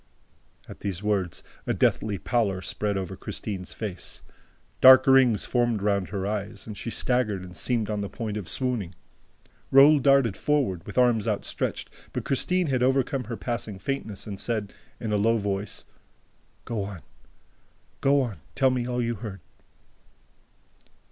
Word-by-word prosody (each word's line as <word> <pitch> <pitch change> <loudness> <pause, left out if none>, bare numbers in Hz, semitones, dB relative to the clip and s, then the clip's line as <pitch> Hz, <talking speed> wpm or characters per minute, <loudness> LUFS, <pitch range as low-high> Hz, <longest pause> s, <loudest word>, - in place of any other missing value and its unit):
'" - - -35
At - - -11
these 100 -1 -4
words, 100 -4 -1 0.2
a - - +1
deathly 105 -2 +1
pallor 100 -3 0
spread 105 -2 -2
over 95 -3 -4
Christine's 95 -4 -6
face, 100 -5 -7 0.6
dark 130 0 +9
rings 130 -5 +5
formed 120 -4 0
round 100 -3 +1
her 100 -2 -3
eyes, 105 +1 -4
she 105 - -6
staggered 115 -6 0
and 90 0 -10
seemed 115 +1 0
on 105 -1 -2
the 100 - -4
point 110 -3 -5
of 105 -5 -4
swooning. 120 -9 0 0.7
Raoul 140 +3 +7
darted 135 -6 +4
forward, 130 - 0
with - - -8
arms 120 -4 +3
outstretched, 105 -2 -2 0.2
but - - -3
Christine 180 +7 +1
had 130 -4 0
overcome 130 0 +1
her 115 +1 -5
passing 115 -4 -4
faintness 110 -3 -4
and 100 -2 -6
said, 110 -4 -2 0.3
in 110 - -3
a - - +3
low 115 +3 +3
voice: 100 -1 -3 0.8
"Go 115 -3 -2
on! 100 -4 -7 1.0
Go 140 0 +4
on! 120 -6 -3 0.2
Tell 135 -1 +3
me 125 -1 -1
all 125 -1 -1
you 120 0 -1
heard!" 105 -5 -7
110 Hz, 155 wpm, -26 LUFS, 100-125 Hz, 1.0 s, dark